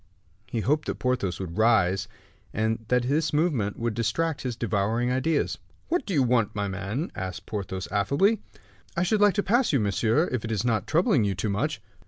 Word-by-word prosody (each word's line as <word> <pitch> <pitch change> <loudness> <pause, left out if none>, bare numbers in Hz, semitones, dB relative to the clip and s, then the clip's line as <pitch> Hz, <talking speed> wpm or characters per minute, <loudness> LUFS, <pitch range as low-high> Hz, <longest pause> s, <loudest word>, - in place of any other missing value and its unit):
He 115 - -2
hoped 150 +6 +1
that - - -1
Porthos 125 -8 -1
would 95 0 -5
rise 105 -3 +3 0.5
and 110 +1 0
that 125 +1 +2
this 150 +5 +1
movement 145 - 0
would 115 -1 -1
distract 150 +8 -1
his 125 -3 -3
devouring 115 +2 0
ideas. 140 +4 0 0.3
"What 340 -5 0
do 200 - -2
you 140 - +4
want, 120 -5 +1
my 100 -1 -1
man?" 100 - -3
asked 95 -2 -5
Porthos, 95 -3 -4
affably. 140 - +2 0.6
"I 170 - +3
should 210 +3 +1
like 205 -3 +5
to 205 - +1
pass 240 +4 +2
you, 140 - +3
monsieur, 110 - +2
if 130 -4 -2
it 115 - -4
is 110 +1 -1
not 110 -3 0
troubling 150 -6 +3
you 100 -1 0
too 105 +4 -2
much." 125 +10 -2
120 Hz, 195 wpm, -26 LUFS, 105-150 Hz, 0.6 s, like